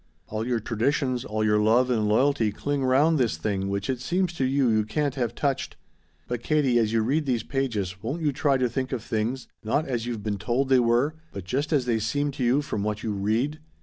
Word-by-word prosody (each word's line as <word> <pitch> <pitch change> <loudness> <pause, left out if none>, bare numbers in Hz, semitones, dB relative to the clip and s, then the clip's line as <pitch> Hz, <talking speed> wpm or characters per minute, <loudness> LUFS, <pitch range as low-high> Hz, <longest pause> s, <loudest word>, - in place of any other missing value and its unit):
All 110 +2 -4
your 120 -2 +1
traditions, 125 +3 0
all 110 0 -2
your 105 0 +3
love 120 +4 +3
and 110 -3 +1
loyalty 115 0 +2
cling 140 +6 -2
round 140 +5 +3
this 115 -11 +1
thing 95 +2 -2
which 100 0 -2
it 130 -2 -1
seems 180 +5 0
to 140 -6 -1
you 135 0 +2
you 110 -2 +3
can't 140 +6 -1
have 120 -3 -2
touched. 140 -2 -1 0.5
But 120 -1 -3
Katie, 135 -4 +2
as 110 -2 +1
you 115 -1 +2
read 145 +5 0
these 120 -4 0
pages 105 -9 -2
won't 145 +9 -3
you 150 - +2
try 140 0 +2
to 130 -1 +1
think 130 +2 -3
of 120 -3 -3
things, 115 +4 -2 0.2
not 140 +8 0
as 120 -3 -2
you've 115 -4 -4
been 105 -2 -2
told 120 +6 0
they 130 -1 +5
were, 120 +5 +2 0.2
but 100 - -7
just 135 - -2
as 140 -5 +2
they 115 -2 +1
seem 145 +7 -1
to 130 - -4
you 130 +5 +3
from 105 - -3
what 105 +1 -2
you 110 - -1
read? 115 +10 0
120 Hz, 230 wpm, -26 LUFS, 110-140 Hz, 0.5 s, they